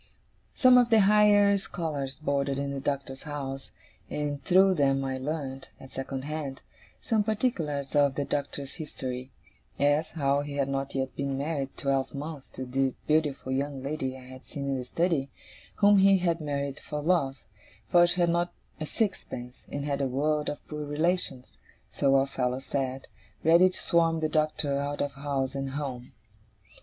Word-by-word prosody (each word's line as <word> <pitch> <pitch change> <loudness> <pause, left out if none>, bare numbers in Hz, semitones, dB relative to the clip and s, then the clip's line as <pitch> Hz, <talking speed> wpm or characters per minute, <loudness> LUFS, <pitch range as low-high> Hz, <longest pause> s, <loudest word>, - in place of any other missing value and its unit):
Some 255 -1 +7
of 245 -1 +3
the 225 -2 +6
higher 205 0 +6
scholars 145 -8 -3
boarded 140 -2 0
in 140 0 -2
the 140 - -3
Doctor's 135 -1 -3
house, 135 -3 -5 0.4
and 145 -2 -3
through 190 +3 +5
them 135 -4 +2
I 130 -1 -2
learned, 135 -2 -4
at 135 - -12
second 135 0 -4
hand, 145 -2 -5 0.4
some 220 -2 +2
particulars 170 - -1
of 140 -2 +4
the 145 - -1
Doctor's 140 -1 -3
history 130 -4 -5 0.5
as, 145 +2 +2
how 140 -3 +1
he 145 0 -6
had 140 -1 0
not 135 0 -2
yet 130 -1 -2
been 140 -1 -2
married 140 -1 -3
twelve 135 0 0
months 145 -1 -6
to 130 - -5
the 135 +1 0
beautiful 150 -4 +1
young 135 0 -2
lady 135 -2 -3
I - - -12
had 130 +1 -11
seen 140 -2 -5
in 135 - 0
the 125 - -5
study, 160 -1 0 0.5
whom 205 -1 +6
he 195 0 +6
had 170 -2 0
married 140 -1 -2
for 150 - -5
love; 145 -4 +1 0.5
for 175 0 +6
she 175 +1 +1
had 170 -1 +4
not 175 +1 +1 0.3
a 155 - -3
sixpence, 125 - -3
and 145 0 -3
had 140 -1 -1
a 135 - +1
world 150 +3 0
of 145 - -7
poor 150 -1 -5
relations 145 -3 -1 0.3
(so 135 -1 +2
our 135 0 +4
fellows 130 -1 -2
said) 135 -1 -2 0.4
ready 170 +3 +6
to 185 - -8
swarm 165 -1 +2
the 155 -1 0
Doctor 150 -2 0
out 145 +1 -3
of 145 - 0
house 140 -1 -2
and 135 -1 -3
home. 130 -4 -5
145 Hz, 175 wpm, -28 LUFS, 135-160 Hz, 0.5 s, Some